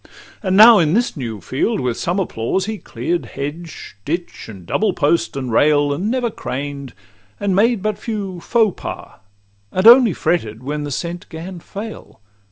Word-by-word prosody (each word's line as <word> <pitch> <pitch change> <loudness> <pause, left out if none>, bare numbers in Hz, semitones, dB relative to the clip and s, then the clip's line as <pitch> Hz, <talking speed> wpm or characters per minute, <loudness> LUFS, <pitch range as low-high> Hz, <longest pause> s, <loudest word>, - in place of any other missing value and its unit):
And 190 -3 +1
now 220 0 +9
in 160 +1 +2
this 240 +2 +1
new 115 -7 -5
field, 165 - -1
with 125 -2 -1
some 175 +8 -2
applause, 185 +2 -1
He 215 -1 -4
clear'd 175 0 -3
hedge, 155 +4 -6
ditch, 170 - -4
and 95 -5 -11
double 210 - 0
post, 145 -6 +1
and 130 -3 -3
rail, 145 +3 +3
And 180 +9 -2
never 245 -1 0
craned, 140 - -5 0.5
and 200 -2 0
made 220 0 +2
but 215 -1 -1
few 200 -5 -4
'faux 220 +1 +1
pas,' - - -7 0.5
And 185 +2 -1
only 235 -3 +8
fretted 125 -11 -1
when 150 +2 -3
the 145 - -5
scent 170 +5 -5
'gan 175 +2 -8
fail. 210 +5 -9
175 Hz, 170 wpm, -19 LUFS, 145-210 Hz, 0.5 s, now